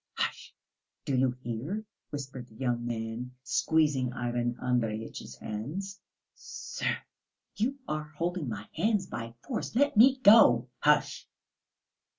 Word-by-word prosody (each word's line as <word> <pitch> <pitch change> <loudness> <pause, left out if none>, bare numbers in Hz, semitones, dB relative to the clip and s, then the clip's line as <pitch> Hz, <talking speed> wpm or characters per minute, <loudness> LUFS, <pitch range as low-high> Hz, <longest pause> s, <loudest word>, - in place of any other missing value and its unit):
"Hush! - - -3 0.5
Do 135 - 0
you 130 0 +3
hear?" 140 - -3 0.2
whispered 135 -4 -6
the 110 - -19
young 120 -1 -1
man, 115 +2 -4
squeezing 145 -2 +2
Ivan 120 -1 -1
Andreyitch's 115 - -2
hands. 150 - -5 0.3
"Sir, - - -3 0.6
you 255 +6 0
are 155 0 -2
holding 170 -4 -1
my 105 -2 -5
hands 205 +2 +1
by 115 -5 -6
force. 235 -3 -4
Let 285 +2 +3
me 260 +5 +7
go!" 200 - +7
"Hush!" 150 0 +2
130 Hz, 120 wpm, -30 LUFS, 120-185 Hz, 0.6 s, me